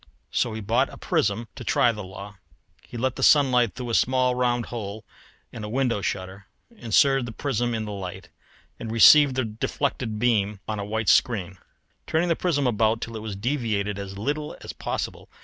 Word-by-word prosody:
So 120 - 0
he 110 - -5
bought 110 +3 +1
a - - -11
prism 110 +4 0
to - - -9
try 120 - +3
the 105 -2 -7
law. 95 +2 -10 0.4
He - - -10
let 130 +1 -1
in - - -6
sunlight 130 -6 +4
through 125 -2 -5
a - - -3
small 130 +1 +2
round 120 -1 0
hole 110 -2 -6 0.5
in 110 - -8
a 105 - -5
window 125 -3 0
shutter, 95 +1 -4 0.3
inserted 135 - +2
the - - -6
prism 120 -1 -1
in 110 -1 -3
the 105 - -6
light, 95 -3 -7 0.5
and 115 - -5
received 135 +4 +7
the 130 -2 0
deflected 110 +1 -3
beam 105 -3 +1
on 110 -1 -3
a - - -3
white 110 +1 -3
screen; 95 -6 +2 0.5
turning 170 +2 +1
the 165 - +3
prism 150 -6 0
about 110 -1 +2
till 115 -1 -6
it 110 - -5
was 105 -2 -5
deviated 105 -3 -2
as 100 -1 -7
little 150 +7 -3
as - - -7
possible. - - -5
115 Hz, 190 wpm, -25 LUFS, 105-125 Hz, 0.5 s, received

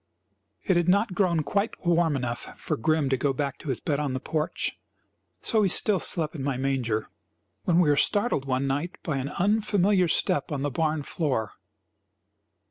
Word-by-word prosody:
It 185 - +2
had 175 0 +2
not 200 +2 +3
grown 175 -4 +2
quite 200 +5 -2
warm 170 -3 +3
enough 120 -2 -4
for - - -2
Grim 155 +4 +1
to 130 - +2
go 135 +1 +1
back 140 0 -3
to 155 - -7
his 130 - -1
bed 145 -2 -1
on 145 -3 -1
the 130 - -2
porch, 155 +3 -2 0.6
so 220 -3 +2
he 200 - +3
still 200 +1 +2
slept 160 -3 0
in 145 -5 -5
my 135 -2 -1
manger, 125 -5 -1 0.6
when 175 0 +3
we 175 - +4
were 145 - +4
startled 205 - +1
one 130 0 0
night 145 +6 -2
by 155 -5 -1
an 135 +1 -3
unfamiliar 200 0 +2
step 150 -2 0
on 140 -2 -2
the 145 - -1
barn 155 +1 0
floor. 130 - -1
155 Hz, 185 wpm, -26 LUFS, 135-180 Hz, 0.6 s, we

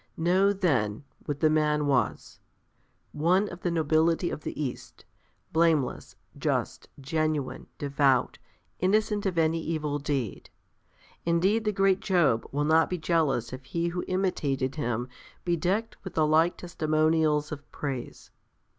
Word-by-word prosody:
Know, 185 +4 +3
then, 140 - 0 0.2
what 145 -1 -3
the 155 - +5
man 150 -1 +2
was; 135 -5 -1 0.7
one 180 +7 +2
of 175 - -9
the 175 - 0
nobility 165 +1 +2
of - - -5
the - - -6
East, 135 -5 -6 0.5
blameless, 160 -5 +1 0.2
just, - - -2
genuine, 155 0 -2
devout, 140 -3 +1 0.4
innocent 205 +2 +1
of 180 -3 -2
any 165 0 +2
evil 150 -3 -2
deed. 140 -7 -3 0.7
Indeed 190 +7 +2
the 210 - +2
great 195 -1 +2
Job 160 - +2
will 145 +1 0
not 160 +1 +4
be 180 - -2
jealous 155 -8 0
if 130 +1 -7
he 170 +5 -1
who 175 +1 -3
imitated 145 -8 -1
him 120 -3 -2 0.4
be 175 -1 +2
decked 195 +7 -1
with 190 - -8
the 155 - +3
like 160 +3 +3
testimonials 155 -2 +1
of 145 -1 -8
praise. 135 -4 -6
155 Hz, 135 wpm, -27 LUFS, 145-175 Hz, 0.7 s, the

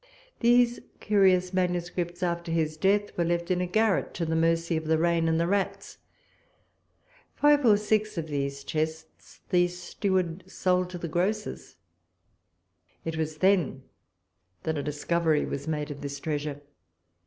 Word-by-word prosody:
These 240 0 +4 0.2
curious 190 -3 +3
manuscripts, 175 -1 -1
after 170 -1 -2
his 160 -2 0
death, 200 +5 +1
were 175 - +1
left 170 +1 -1
in 180 0 +1
a 180 - -1
garret 215 +2 +1
to 170 - -1
the 160 0 -1
mercy 165 +1 +1
of 160 0 -2
the 160 0 +3
rain 165 0 +2
and 160 0 +2
the 170 - +2
rats. 195 +2 -2 1.4
Five 290 -1 +4
or 210 -2 +6
six 215 -1 0
of 165 - -2
these 140 -1 -3
chests 155 +2 -5
the 175 -1 +4
steward 180 0 -2
sold 180 -1 +1
to 180 - -6
the 170 - -5
grocers. 195 +7 -2 1.3
It 165 -1 -3
was 155 -1 -3
then 180 -7 +2 0.8
that 160 - -1
a - - -1
discovery 155 +2 0
was 140 - -5
made 150 -1 -2
of 145 - -8
this 140 0 -5
treasure. 145 -1 -3
170 Hz, 150 wpm, -27 LUFS, 160-185 Hz, 1.4 s, or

